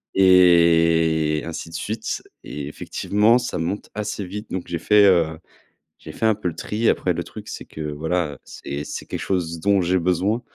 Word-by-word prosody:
et 85 -4 +4
ainsi 85 0 -6
de - - -14
suite 110 +5 -4 0.2
et 75 -1 -6
effectivement 105 +9 +1
ça 125 - -4
monte 85 +6 -3
assez 105 -1 -3
vite 105 +4 -7
donc 95 -1 -4
j'ai 85 - -3
fait, 105 +5 +5
heu, 85 -4 +3 0.6
j'ai 80 - -10
fait - - -2
un 110 - +5
peu 90 - -4
le 85 - -3
tri. 105 +7 -1
Après 90 - +1
le 85 +1 -3
truc - - -11
c'est - - -7
que 80 - -9
voilà, 80 +2 -1
heu, - - -12
c'est 70 +1 -7
c'est - - -6
quelque - - -5
chose 85 -3 -2
dont 100 +2 +2
j'ai 90 +1 +1
besoin 90 +6 0
90 Hz, 195 wpm, -22 LUFS, 80-100 Hz, 0.6 s, fait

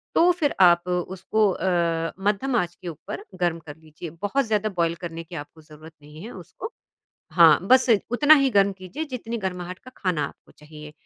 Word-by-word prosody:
तो 350 +2 +5
फिर 320 -5 0
आप 175 -1 +5
उसको 190 +4 0
अ, 170 -3 -1
मद्धम 210 +6 0
आंच 175 -5 -1
के 180 - -11
ऊपर 170 +5 -7 0.2
गर्म 175 -2 0
कर 150 -3 -11
लीजिए, 160 +1 -10
बहुत 205 - -2
ज़्यादा 215 -1 0
बॉयल 170 -1 +1
करने 165 -1 -6
की 170 +1 -11
आपको 160 +1 -9
ज़रूरत 155 +1 -15
नहीं 150 +3 -13
है 230 - -8
उसको 250 - -9 0.6
हाँ, 165 -4 +7
बस 260 0 +5 0.2
उतना 290 +6 +6
ही 275 -3 +3
गर्म 200 -2 +3
कीजिए 185 - -6
जितनी 245 -5 -5
गरमाहट 180 -2 -5
का 255 - -13
खाना 180 -6 -1
आपको - - -15
चाहिए। 150 0 -12
180 Hz, 185 wpm, -24 LUFS, 165-220 Hz, 0.6 s, हाँ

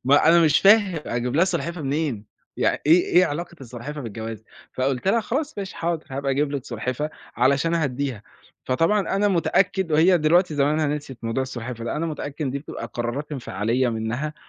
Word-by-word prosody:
ما 145 +4 +5
أنا 170 +1 +7
مش 155 -3 +4
فاهم، 200 -4 +5
أجيب 120 +2 -2
لها 170 - +5
سلحفاة 170 -3 -3
منين، 135 -6 -2 0.3
يعن - - +1
إيه 170 +4 +6
إيه 180 - +8
علاقة 170 +3 -5
السلحفاة 130 +4 -7
بالجواز؟ 110 -2 -6 0.3
فقلت 130 +4 -1
لها: 230 +3 +3
"خلاص 280 +4 -3
ماشي 195 -1 -5
حاضر، 170 -1 -2
هابقى 140 +1 -2
أجيب 140 +2 0
لِك 135 -3 -3
سلحفاة." 130 +4 -3 0.3
علشان 140 +7 +2
أهدِّيها، 135 -7 -2 0.4
فطبعًا 165 +11 +2 0.2
أنا 205 +1 +3
متأكد 185 -1 +1
وهي 175 +4 +5
دلوقتي 165 +2 +3
زمانها 150 +2 +2
نسيت 145 -3 -4
موضوع 115 +3 -1
السلحفاة 125 -2 -6
ده، - - -3
أنا 165 +2 -1
متأكد 150 -1 -4
إن 130 - -1
دي 140 - -3
بتبقى 145 - -7
قرارات 120 +6 -3
انفعالية 125 -1 -1
منها 115 +7 -3
145 Hz, 180 wpm, -23 LUFS, 125-170 Hz, 0.4 s, إيه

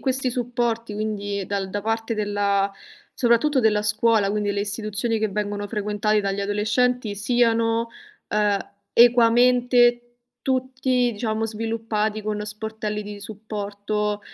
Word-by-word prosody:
questi 265 -1 0
supporti 235 -2 -2
quindi 205 -2 -3
dal 195 -1 -3
da 205 +1 -2
parte 225 +2 -2
della 205 -1 0 0.5
soprattutto 255 +3 +3
della 210 -2 +2
scuola, 215 0 +3
quindi 205 0 -1
le 200 - -2
istituzioni 215 +2 -2
che 220 - +1
vengono 205 0 -3
frequentate 210 0 0
dagli 200 0 -2
adolescenti 215 +3 0
siano, 230 +1 +1 0.4
ehm, 210 -1 +1 0.3
equamente 240 +1 +5 0.4
tutti 260 -1 0
diciamo 220 +1 -2
sviluppati 220 -1 -2
con 210 0 -3
sportelli 215 0 -4
di 205 0 -8
supporto, 210 0 -4
215 Hz, 115 wpm, -23 LUFS, 205-235 Hz, 0.5 s, equamente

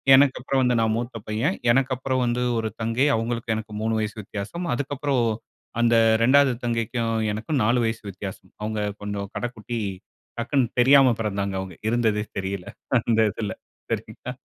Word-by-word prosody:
எனக்கு 135 0 +5
அப்புறம் 135 +1 +1
வந்து 125 -1 +3
நான் 110 -1 +2
மூத்த 120 0 -4
பையன். 110 +2 0 0.2
எனக்கு 135 +1 +2
அப்புறம் 130 0 -1
வந்து 120 +1 0 0.2
ஒரு 110 - -1
தங்கை, 115 +5 +2
அவங்களுக்கும் 115 0 -1
எனக்கும் 110 -1 -5
3 110 0 +1
வயசு 105 0 -2
வித்யாசம். 105 - -5
அதுக்கப்புறம் 145 0 -1
ஓ - - +2 0.6
அந்த 120 0 +4 0.3
2வது 135 +1 +5
தங்கைக்கும் 115 0 -1 0.2
எனக்கும் 115 +6 -1
4 120 +3 +3
வயசு 115 0 -1
வித்யாசம். 95 -1 -8
அவங்க 110 0 -2 0.2
கொஞ்சம் 100 -1 -3
கடக்குட்டி 120 -1 -4 0.6
டக்குனு 125 +1 +1
தெரியாம 130 0 +7
பெறந்தாங்க 100 -2 -1
அவங்க, 95 -1 -6
இருந்ததே 110 -2 +2
தெரியல. 95 -1 -3 0.3
அந்த 115 -1 +1
இதில 100 -1 -4 0.4
சரிங்களா? - - -4
115 Hz, 155 wpm, -24 LUFS, 105-125 Hz, 0.6 s, தெரியாம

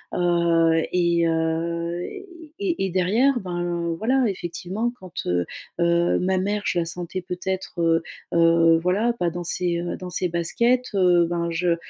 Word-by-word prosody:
heu, 170 -2 +3
et 170 -1 +2
heu, 170 +1 -1 0.6
et 345 - -1
et - - -2
derrière 190 +9 +2
ben 175 -2 -2
voilà, 255 +3 +2
effectivement 190 +4 -3
quand, 185 -2 -12
heu 90 0 +1 0.4
heu, 170 0 +2
ma 185 +1 +1
mère 205 +2 -1
je 175 - +1
la 165 - 0
sentais 175 +2 -4
peut-être, 180 0 -4
heu 165 0 +3 0.3
heu, 165 0 +5
voilà, 195 +7 +1
pas 180 -7 -1
dans 175 +1 -5
ses, 175 0 0
heu, 175 - -4
dans 180 -1 -7
ses 180 0 0
baskets, 235 +10 +1
heu, 180 -3 +4
ben, 170 -1 -1
je 170 0 +1
175 Hz, 155 wpm, -23 LUFS, 170-185 Hz, 0.6 s, heu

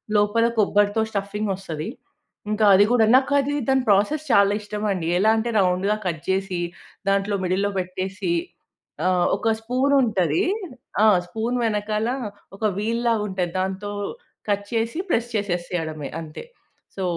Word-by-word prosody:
లోపల 210 +2 +3
కొబ్బరితో 205 0 +3
స్టఫింగొస్తది. 195 -5 -3 0.6
ఇంకా 215 0 +2
అది 195 +2 +7
గూడా 240 -3 +5
నాకు 265 +2 +3
అది 280 +1 -1 0.2
దాని 265 -1 +3
ప్రాసెస్ 210 +10 +2
చాలా 200 -2 +5
ఇష్టమండి. 205 -4 -2
ఎలా 215 +3 +4
అంటే 230 +2 -1
రౌండ్‌గా 190 +2 +2
కట్ 165 -4 -2
చేసి 190 -1 0 0.5
దాంట్లో 200 +1 +1
మిడిల్‌లో 195 +3 0
పెట్టేసి 185 - -3 0.8
ఆహ్, 180 -1 +2
ఒక 225 0 +1
స్పూన్ 255 +5 +1
ఉంటది 215 - +1 0.6
ఆ! - - +7 0.2
స్పూన్ 225 +6 -2
వెనకాల 215 +1 -1 0.5
ఒక 220 - -2
వీల్ 230 +3 -1
లాగుంటది. 195 -6 -1
దాంతో 190 +2 -3 0.6
కట్ 205 0 -1
చేసి 230 +7 -1
ప్రెస్ 235 +1 +1
చేసేయడమే 175 -6 -3
అంతే. 155 -2 -8 0.5
సో 190 - -2
205 Hz, 130 wpm, -23 LUFS, 190-225 Hz, 0.8 s, అది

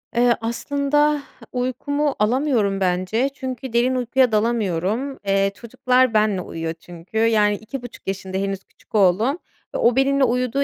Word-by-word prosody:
Eee, 240 0 +4
aslında 285 +5 +1 0.3
uykumu 275 +4 -1
alamıyorum 220 -3 +1
bence 185 +7 0
çünkü 260 -2 -6
derin 245 +2 +2
uykuya 250 0 +2
dalamıyorum. 215 +3 0
Eee, 195 0 +2
çocuklar 250 +1 +1
benimle 210 -3 +2
uyuyor 165 -1 -4
çünkü. 170 +4 -10
Yani 220 -2 +3
2.5 245 +3 -9
yaşında 190 -1 -3
henüz 195 0 -2
küçük - - -16
oğlum 210 - +3 0.4
ve - - +1
o 235 0 +3
benimle 275 +1 +3
uyuduğu 250 +2 +1
235 Hz, 135 wpm, -22 LUFS, 195-260 Hz, 0.4 s, Eee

